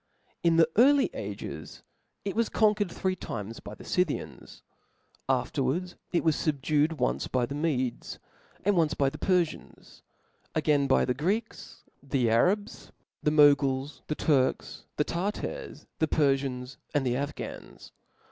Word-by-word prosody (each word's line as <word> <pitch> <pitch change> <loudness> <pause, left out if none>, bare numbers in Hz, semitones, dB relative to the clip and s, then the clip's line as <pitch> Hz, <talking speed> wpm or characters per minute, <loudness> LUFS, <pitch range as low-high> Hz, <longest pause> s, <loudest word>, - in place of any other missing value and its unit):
In 170 -1 +3
the 165 -1 +6
early 275 +2 +6
ag5 - - -7 0.4
it 200 - -2
was 230 0 +1
conquered 210 -3 +2
three 190 +1 -1
timei 115 - -6
by 105 - -8
the - - -13
Scythians 180 -5 -3 0.3
} - - -33
afterwards 150 +8 -2 0.2
ic 175 - +1
was 160 -2 +4
fubdued 150 +1 +1
once 65 - -1
by 125 -2 0
the 140 - -6
Medes, 140 -5 -2 0.5
"^and 205 - +4
once 160 -3 +2
by 135 -1 +1
the - - -9
Perfians; 180 -4 -2 0.5
again 150 -3 +2
by 130 - +3
the 125 - +1
Greeks, 190 - -3 0.2
the 135 -3 0
Arabs^ 195 - +1 0.3
the - - +2
Moguls, 145 -2 +3
the 155 - -2
Turks, 135 -5 0
the 150 - +3
Tartars, 205 - -4
the 160 - +2
Perfians, 135 -3 0 0.2
and 140 -2 +2
the 125 -1 +1
Afghans. 145 +3 -6
150 Hz, 140 wpm, -28 LUFS, 135-180 Hz, 0.5 s, the